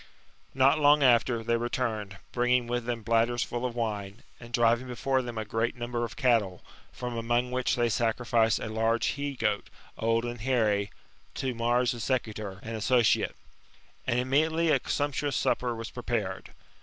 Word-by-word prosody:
Not 135 +3 +4
long 145 0 +5
after, 120 -2 +3
they 115 +1 +1
returned, 115 -4 -2
bringing 125 0 +2
with 120 0 -2
them 120 -2 -3
bladders 115 +2 +2
full 120 +1 -3
of 120 - -8
wine, 105 -2 -3 0.2
and 120 -1 -12
driving 120 +1 +2
before 130 +2 0
them 120 -2 -6
a 110 - -2
fi^eat 115 +2 -1
number 120 0 -3
of 115 - -5
cattle; 115 -9 +1 0.3
from 125 -1 -5
among 120 +2 0
which 125 0 0
they 120 -1 +2
sacrificed 115 0 +1
a - - -5
large 115 +1 +1
he 145 0 -3
goat, - - -1 0.3
old 115 +1 +1
and 120 -2 -5
hairy, 110 -5 +1 0.5
to 130 -1 -2
Mars 120 +1 +1
the 120 - -6
Secutor^ 110 -6 -2
and 115 +1 -5
Associate. 120 +2 +2 0.7
And 120 - +1
immediately 160 +6 +2
a 140 - +4
sumptuous 145 -1 -1
supper 120 -1 0
was 115 0 -6
prepared. 115 -6 -3
120 Hz, 165 wpm, -28 LUFS, 115-125 Hz, 0.7 s, long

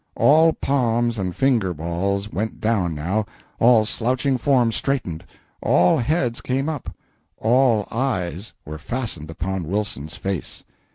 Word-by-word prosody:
All 160 +3 +5
palms 120 -4 0
and 90 -2 -3
finger 115 -10 +1
balls 95 +6 -2
went 110 +3 -3
down, 100 -7 0
now, 90 +9 -1 0.4
all 115 -2 +5
slouching 130 +5 0
forms 120 -3 +2
straightened, 125 - -2 0.4
all 90 +1 +4
heads 125 -2 0
came 135 +3 -1
up, 155 -5 -4 0.5
all 115 -2 +3
eyes 100 -6 -2
were 75 +1 -7
fastened 110 - -5
upon 90 +1 -3
Wilson's 90 -6 -3
face. 95 -4 -4
110 Hz, 125 wpm, -22 LUFS, 90-130 Hz, 0.5 s, All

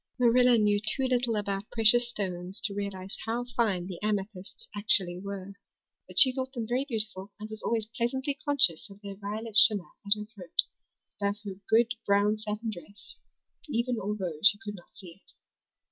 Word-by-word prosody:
Marilla 245 0 +5
knew 210 -1 +3
too 220 +6 0
little 250 -3 +1
about 200 -1 -3
precious 235 +2 +4
stones 185 -3 -2
to 210 - 0
realize 195 -1 -5
how 235 +2 -1
fine 205 -8 +1
the 180 -2 -7
amethysts 205 -2 -4
actually 190 -4 +1
were; 200 0 -7 0.5
but - - -1
she 260 - +8
thought 260 0 -3
them 235 -4 -4
very 250 +4 0
beautiful 210 -4 -2
and 215 +1 -8
was 220 - -7
always 225 -2 0
pleasantly 255 +4 -2
conscious 260 - +3
of 195 0 -14
their 200 -1 -6
violet 210 +2 -6
shimmer 205 -5 +6
at 200 0 +4
her 210 - -6
throat, 180 -5 +1 0.6
above 200 0 +1
her 200 - -4 0.2
good 230 +2 +4
brown 205 +1 +3
satin 215 +1 -4
dress, 200 +2 -10 0.6
even 240 -2 -1
although 190 -6 -3
she 205 0 +8
could 210 -1 -7
not 180 -4 -13
see 185 0 -12
it. - - +4
210 Hz, 175 wpm, -29 LUFS, 195-230 Hz, 0.6 s, she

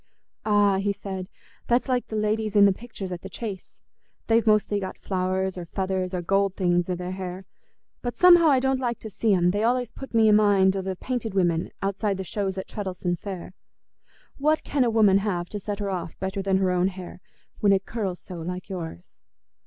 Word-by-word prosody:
"Ah," 205 -2 +4
he 200 +1 0
said, 190 -2 -6 0.4
"that's 240 +1 +2
like 250 -2 0
the 220 - -5
ladies 215 0 0
in 205 -1 +8
the 200 - +5
pictures 205 -3 -8
at 175 -1 -5
the 195 - -8
Chase; 200 -1 -7 0.4
they've 230 0 +2
mostly 210 -1 +3
got 190 -1 -5
flowers 185 0 -1
or 175 - -6
feathers 190 0 -2
or 175 - -3
gold 195 +1 +1
things 175 -1 +1
i' 180 - 0
their 180 +1 -5
hair, 185 0 -6 0.6
but 240 -1 -4
somehow 345 -2 +7
I 275 -4 +5
don't 265 0 +1
like 240 -2 -1
to 220 - -7
see 220 +2 +1
'em; 175 -1 +3
they 205 +2 -1
allays 245 +1 +1
put 270 -3 -9
me 225 -1 +5
i' - - +6
mind 200 -2 +4
o' 195 - -1
the 190 0 -3
painted 230 0 -4
women 175 -3 +1
outside 200 0 -1
the 190 - -4
shows 195 0 -3
at 190 - -4
Treddles'on 185 -4 -3
Fair. 185 -1 -7 0.9
What 305 +2 +2
can 285 -3 +1
a 240 - +2
woman 210 -4 +5
have 180 -4 -2
to 210 - -5
set 205 +1 -4
her 200 -1 -3
off 175 -3 -5
better 190 +1 -3
than 195 -1 +2
her 190 -1 +1
own 180 0 +2
hair, 185 -2 -7 0.4
when 205 - +4
it 195 0 +2
curls 195 -6 -3
so, 180 - -9
like 180 +3 -5
yours? 165 - -7
195 Hz, 210 wpm, -25 LUFS, 185-215 Hz, 0.9 s, in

